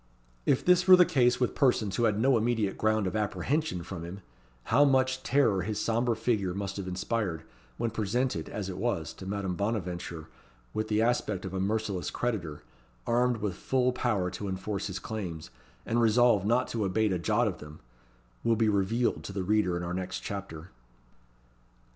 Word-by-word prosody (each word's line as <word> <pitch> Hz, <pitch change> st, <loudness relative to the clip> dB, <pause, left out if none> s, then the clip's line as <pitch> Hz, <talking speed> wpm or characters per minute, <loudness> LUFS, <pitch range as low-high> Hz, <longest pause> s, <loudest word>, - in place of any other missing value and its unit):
If 130 Hz, -, +2 dB
this 180 Hz, +1 st, +4 dB
were 185 Hz, -, +11 dB
the 180 Hz, -1 st, +6 dB
case 125 Hz, -5 st, +2 dB
with 125 Hz, -, +1 dB
persons 120 Hz, -7 st, +2 dB
who 120 Hz, -, +2 dB
had 105 Hz, -2 st, +2 dB
no 130 Hz, +3 st, +4 dB
immediate 110 Hz, -3 st, +1 dB
ground 110 Hz, -1 st, +1 dB
of 95 Hz, -, -2 dB
apprehension 105 Hz, -, -1 dB
from 90 Hz, -1 st, -7 dB
him, 90 Hz, +4 st, -8 dB, 0.4 s
how 145 Hz, -, +4 dB
much 130 Hz, -2 st, +2 dB
terror 130 Hz, -8 st, +2 dB
his 105 Hz, +3 st, -3 dB
sombre 115 Hz, +2 st, +1 dB
figure 110 Hz, -5 st, 0 dB
must 100 Hz, -1 st, -4 dB
have 95 Hz, -2 st, -5 dB
inspired, 90 Hz, -2 st, -2 dB, 0.3 s
when 115 Hz, -, -1 dB
presented, 110 Hz, -3 st, -1 dB
as 100 Hz, -3 st, -4 dB
it 95 Hz, -, -6 dB
was, 85 Hz, -11 st, -1 dB
to 95 Hz, -, -10 dB
Madame 100 Hz, -2 st, -2 dB
Bonaventure, 90 Hz, -6 st, -3 dB, 0.5 s
with 110 Hz, 0 st, -2 dB
the 110 Hz, +1 st, +2 dB
aspect 110 Hz, -5 st, 0 dB
of 95 Hz, -, -6 dB
a 95 Hz, -, -2 dB
merciless 100 Hz, -2 st, -1 dB
creditor, 90 Hz, -11 st, -3 dB, 0.4 s
armed 120 Hz, 0 st, +2 dB
with 105 Hz, -3 st, -1 dB
full 125 Hz, +6 st, +1 dB
power 105 Hz, -8 st, 0 dB
to 100 Hz, -, -5 dB
enforce 95 Hz, +1 st, -3 dB
his 95 Hz, -, -4 dB
claims, 90 Hz, -8 st, -6 dB, 0.3 s
and 120 Hz, +1 st, +1 dB
resolved 115 Hz, -3 st, +4 dB
not 125 Hz, +3 st, +2 dB
to 115 Hz, -2 st, -2 dB
abate 100 Hz, +1 st, +1 dB
a 90 Hz, -, -1 dB
jot 110 Hz, +6 st, +2 dB
of 95 Hz, -, -3 dB
them, 75 Hz, +1 st, -11 dB, 0.6 s
will 115 Hz, -, +3 dB
be 110 Hz, -1 st, +2 dB
revealed 105 Hz, +4 st, +1 dB
to -, -, -5 dB
the 95 Hz, -1 st, -3 dB
reader 90 Hz, -3 st, +1 dB
in 85 Hz, -, -4 dB
our 85 Hz, 0 st, -3 dB
next 90 Hz, 0 st, -4 dB
chapter. 90 Hz, -5 st, -7 dB
105 Hz, 185 wpm, -29 LUFS, 95-120 Hz, 0.6 s, were